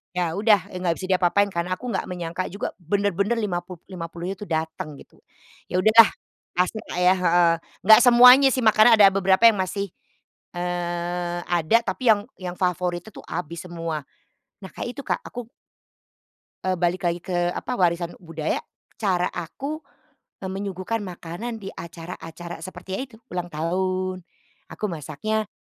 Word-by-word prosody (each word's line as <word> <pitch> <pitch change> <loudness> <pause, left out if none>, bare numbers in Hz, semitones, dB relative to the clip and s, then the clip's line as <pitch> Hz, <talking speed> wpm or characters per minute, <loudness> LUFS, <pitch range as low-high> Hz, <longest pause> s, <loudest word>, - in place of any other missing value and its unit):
Iya, 175 -2 0
udah, 205 -3 +3
enggak 180 -2 0
bisa 185 - -4
diapa-apain, 185 +2 +3
karena 175 +2 -1
aku 250 - -8
enggak 190 - -1
menyangka 175 0 -3
juga 200 - -4
bener-bener 200 +4 0
lima 185 -5 -1
puluh-lima 175 -1 -8
puluhnya 175 +3 -5
itu 210 - -7
dateng, 160 -2 -3
gitu. - - -19 0.5
Ya - - -4
udahlah, 220 +1 +8 0.5
pasang 185 +4 0
nggak 180 - -4
yah, 185 +1 +5
heeh. 170 0 +5 0.3
Enggak 220 +1 +9
semuanya 250 +3 +9
sih, 255 - -1
makanya 220 +2 +6
ada 200 - +9
beberapa 195 +2 +2
yang 210 -4 +4
masih, 195 0 -2 0.6
eee, 175 0 -2
ada. 175 +5 +3
Tapi 195 +6 -2
yang 205 - +4 0.2
yang 180 -1 -5
favorit 180 -1 0
itu 220 - -12
tuh - - -11
habis 170 -1 -5
semua. 165 -4 -4 0.6
Nah, 190 - -8
kayak - - -5
itu, 280 - -5
Kak, - - 0
aku 240 -1 -8 1.1
eee, 185 0 +1
balik 175 +1 0
lagi 170 +1 -1
ke 175 0 -1
apa, 250 - -4
warisan 170 -2 0
budaya 160 -2 -3 0.3
cara 185 -4 +1
aku, 275 - -5 0.6
eee, 190 - -3
menyuguhkan 195 +3 -3
makanan 185 +5 -6
di 195 -2 -8
acara-acara 170 0 -8
seperti 185 +2 -10
ya, - - -2
itu 220 - -16 0.2
ulang 175 -1 -3
tahun, 185 +3 -2 0.5
aku 215 - -5
masaknya, 200 +8 -3
180 Hz, 155 wpm, -24 LUFS, 170-205 Hz, 1.1 s, Enggak